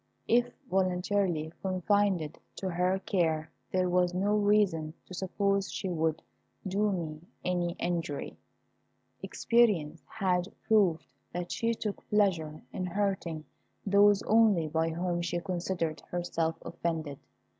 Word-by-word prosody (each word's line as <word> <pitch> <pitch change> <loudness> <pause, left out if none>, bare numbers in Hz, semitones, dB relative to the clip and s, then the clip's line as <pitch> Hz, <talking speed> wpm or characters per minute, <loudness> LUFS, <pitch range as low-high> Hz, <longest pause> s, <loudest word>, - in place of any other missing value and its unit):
If 240 +1 +3 0.2
voluntarily 180 -4 0
confided 185 -3 +1 0.2
to 190 -1 -3
her 180 +2 +1
care 160 -5 0 0.2
there 185 -1 +2
was 180 0 +2
no 200 +3 +2
reason 205 -7 +2
to - - -11
suppose 195 +1 0
she 190 - -3
would 160 -2 0 0.4
do 205 +2 +1
me 160 -5 -4 0.2
any 175 -1 0
injury. 165 -5 -2 0.9
Experience 185 -10 +2
had 185 -4 0 0.2
proved 195 -7 +3 0.3
that 175 0 -4
she 230 0 0
took 210 -2 -4
pleasure 170 -7 +1
in 185 - -2
hurting 180 -5 -1 0.4
those 200 0 +5
only 210 -7 +4
by 160 +1 0
whom 175 +1 -1
she 175 0 -1
considered 175 -3 -2
herself 170 -2 -1
offended. 160 -4 -3
180 Hz, 120 wpm, -30 LUFS, 165-200 Hz, 0.9 s, those